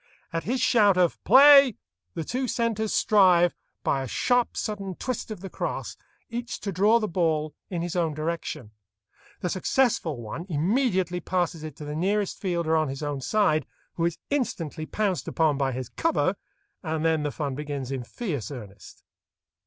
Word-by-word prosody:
At 165 - -2
his 250 +4 0
shout 205 -7 +4
of 180 -2 +1
"Play," 275 0 +8 0.4
the 165 - -2
two 255 - -2
centres 225 -3 -1
strive, 180 -5 +4 0.3
by 135 - +1
a 135 - -4
sharp, 245 - +1
sudden 195 -3 -3
twist 255 +2 -4
of 215 -5 -7
the 195 - -7
crosse, - - -4 0.3
each 240 +1 -5
to 200 - -3
draw 205 +6 +4
the 215 - -1
ball 160 -4 0 0.2
in 175 -3 -3
his 175 0 -4
own 165 -4 0
direction. 155 -8 -4 0.7
The 180 - -1
successful 185 - +1
one 120 - -6
immediately 185 - +1
passes 175 -2 -1
it 155 -3 -7
to 150 - -9
the 150 0 -5
nearest 200 +4 0
fielder 170 -4 0
on 155 -1 +2
his 135 +2 -5
own 145 -2 -3
side, 155 -4 +1 0.3
who 165 - -1
is 170 -1 -1
instantly 165 - -2
pounced 205 -4 -1
upon 155 -3 +1
by 135 -1 +1
his 130 -1 -4
"cover," 330 0 0 0.5
and 160 -2 -2
then 160 -1 +2
the 150 - -1
fun 145 -3 -3
begins 140 -2 -5
in 130 -2 -3
fierce 145 - -4
earnest. 105 -8 -11
175 Hz, 170 wpm, -26 LUFS, 150-210 Hz, 0.7 s, Play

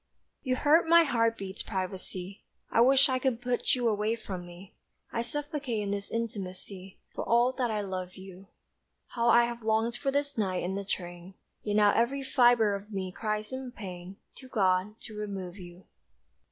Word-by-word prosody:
You 255 -2 0
hurt 315 +5 +4
my 335 0 +8
heart 230 -5 +1
beats' 195 0 -6
privacy; 190 0 -5 0.3
I 230 - +4
wish 270 +3 +6
I 260 -1 0
could 255 -3 0
put 245 0 0
you 245 -2 0
away 215 +1 +1
from 185 -6 -7
me; 175 +2 -13 0.4
I 230 - 0
suffocate 285 -1 -3
in 200 - -2
this 200 0 -3
intimacy, 195 -4 -5 0.2
For - - -3
all 240 +2 +3
that 245 -2 +1
I 215 -1 -1
love 185 -2 -5
you; 190 0 -12 0.6
How 235 0 +1
I 235 0 +6
have 235 0 -5
longed 220 +2 +1
for 275 +1 -1
this 285 -2 -1
night 185 -3 0
in 180 +2 -2
the 200 +1 -3
train, 175 -1 -6 0.3
Yet 205 -1 -2
now 210 -1 +6
every 265 +4 +1
fibre 240 -5 +4
of 200 +2 -6
me 190 -2 -3
cries 215 +3 -3
in 260 -1 -5
pain 185 -3 -8 0.2
To 260 - -12
God 200 -2 +1
to 220 - -9
remove 195 -3 -5
you. 175 -1 -12
215 Hz, 180 wpm, -29 LUFS, 190-245 Hz, 0.6 s, my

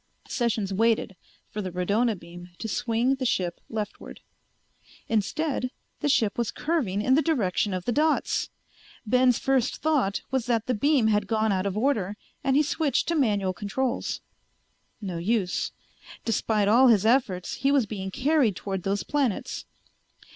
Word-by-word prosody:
Sessions 220 -6 -1
waited 220 -1 +1 0.4
for 210 - -3
the 190 - -4
radona 205 +5 +1
beam 175 +1 -11
to 225 - -5
swing 240 +3 +1
the 265 -1 -3
ship 180 -7 -1
leftward. 215 -2 -6 0.9
Instead, 255 +5 0 0.3
the 295 - 0
ship 225 -5 +2
was 235 - 0
curving 240 - -1
in 260 - +3
the 295 - +5
direction 215 - +1
of 185 -1 -3
the - - +1
dots! 305 +5 +1 0.6
Ben's 250 +1 +4
first 265 -2 +1
thought 285 -11 0
was 260 -2 0
that 230 -2 +1
the 255 - 0
beam 275 +2 +2
had 210 -2 +2
gone 220 0 +1
out 190 0 0
of 200 +1 -3
order, 215 -5 0 0.3
and 270 0 +2
he 295 - +5
switched 300 0 0
to 340 - +1
manual 205 - +1
controls. 235 +7 -2 0.8
No 185 -5 -4
use. 190 0 0 0.5
Despite 215 -2 +1
all 245 +5 +6
his 215 -4 +4
efforts 220 -7 +1
he 275 +1 +2
was 275 -5 +3
being 195 -2 -5
carried 265 - +2
toward 195 -1 -4
those 195 +2 -1
planets. 275 -8 -1
225 Hz, 155 wpm, -26 LUFS, 200-265 Hz, 0.9 s, all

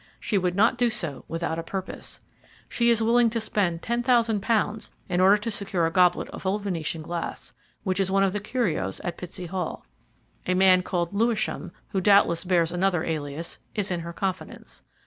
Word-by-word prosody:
She 215 - -2
would 180 -2 +1
not 215 +4 +3
do 245 -1 +4
so 170 - -2
without 165 0 -2
a - - -4
purpose. 190 +2 -6 0.5
She 235 0 +2
is 230 -1 +3
willing 235 +1 +4
to 230 +1 -1
spend 190 -6 -1
ten 235 +1 0
thousand 235 -4 +2
pounds 215 0 0 0.2
in 180 - +1
order 195 +2 +6
to 210 +2 -4
secure 195 -4 -1
a 165 - 0
goblet 180 -1 +3
of - - -9
old 195 +2 -1
Venetian 165 -4 -3
glass, 170 +1 -5 0.3
which 190 -1 -1
is 190 -1 +1
one 195 +1 +3
of 195 -1 +1
the 205 - -1
curios 200 - -1
at 175 - -4
Pitsey 180 +1 -6
Hall. 180 -1 -4 0.6
A 185 - +2
man 185 -1 +6
called 175 -1 -2
Lewisham, 225 +1 0 0.2
who 190 - -1
doubtless 200 -4 +4
bears 175 -3 +2
another 180 -1 +1
alias, 155 0 -4 0.2
is 205 -3 -1
in 175 - -1
her 170 0 -6
confidence. 170 - -5
190 Hz, 190 wpm, -26 LUFS, 170-210 Hz, 0.6 s, order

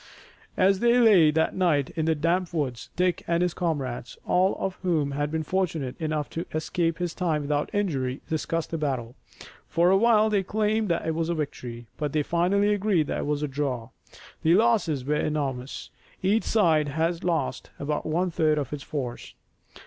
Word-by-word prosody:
As 190 +1 +4
they 240 +2 +4
lay 200 -10 +6
that 160 +1 +1
night 155 -7 +1
in 160 - -2
the 160 0 +2
damp 170 +4 0
woods, 130 -7 -2
Dick 180 0 +1
and 170 +1 +2
his 180 -1 0
comrades, 140 -9 -3
all 185 +2 +2
of 190 - -2
whom 160 -6 +1
had 145 +1 -1
been 160 +1 -2
fortunate 160 -7 -1
enough 155 -2 -1
to 165 - -4
escape 165 +1 0
this 175 -1 -2
time 160 -5 -1
without 145 0 -1
injury, 140 - -1
discussed 160 +1 -2
the 165 - -2
battle. 130 -6 -2 0.5
For 170 +2 +3
a 195 - +5
while 220 0 +4
they 205 -2 +3
claimed 215 +2 0
that 170 0 0
it 160 - 0
was 165 +1 -1
a 170 - 0
victory, 125 -6 -5
but 150 -2 -3
they 155 -1 +2
finally 195 +6 +2
agreed 200 -6 +1
that - - -1
it - - -2
was 150 0 -1
a - - 0
draw. 130 -4 -3 0.5
The 165 +1 +4
losses 195 - +2
were 150 - 0
enormous. 140 -4 -2 0.3
Each 205 +4 +2
side 160 -9 +3
had 165 +4 -1
lost 160 -7 -1
about 150 +1 -2
one 175 +3 0
third 155 -2 +2
of 145 -1 -3
its 145 - -5
force. 130 -7 -5
160 Hz, 185 wpm, -26 LUFS, 145-185 Hz, 0.5 s, lay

